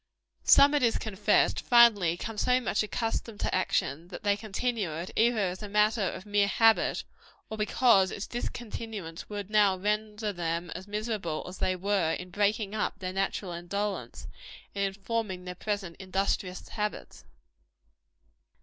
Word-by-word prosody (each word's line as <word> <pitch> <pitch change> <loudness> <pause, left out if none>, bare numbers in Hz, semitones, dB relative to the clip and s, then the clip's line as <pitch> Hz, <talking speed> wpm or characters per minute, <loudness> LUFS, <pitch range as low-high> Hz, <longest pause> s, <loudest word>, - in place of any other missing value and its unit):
Some, 285 +1 +7
it 295 - +2
is 235 -2 +3
confessed, 210 -1 +1
finally 225 -8 +5
become 210 +5 -5
so 250 0 +3
much 230 -4 0
accustomed 215 +2 -3
to - - -1
action, 165 -3 0
that 185 - -9
they 205 -1 +3
continue 215 -1 -2
it, 170 +3 -5
either 235 +1 +3
as 185 -2 -1
a 210 - -6
matter 210 +2 +3
of 190 0 -3
mere 205 -1 +2
habit, 225 +2 +3 0.5
or - - -3
because 210 -3 +4
its 200 - -5
discontinuance 220 -7 -6
would 205 -1 -6
now 205 -3 +4
render 210 +1 -2
them 170 0 -3
as 185 +3 -7
miserable 210 -6 -3
as 180 0 -9
they 185 - +1
were 185 -3 +1
in 180 0 -6
breaking 205 +1 0
up 215 - -2
their 185 -1 -5
natural 195 -1 -2
indolence, 200 +4 -4 0.5
and 200 0 0
in 200 - -25
forming 195 -4 -2
their 180 - -5
present 195 -2 -4
industrious 190 -1 -2
habits. 210 -1 -4
205 Hz, 155 wpm, -29 LUFS, 185-215 Hz, 0.5 s, Some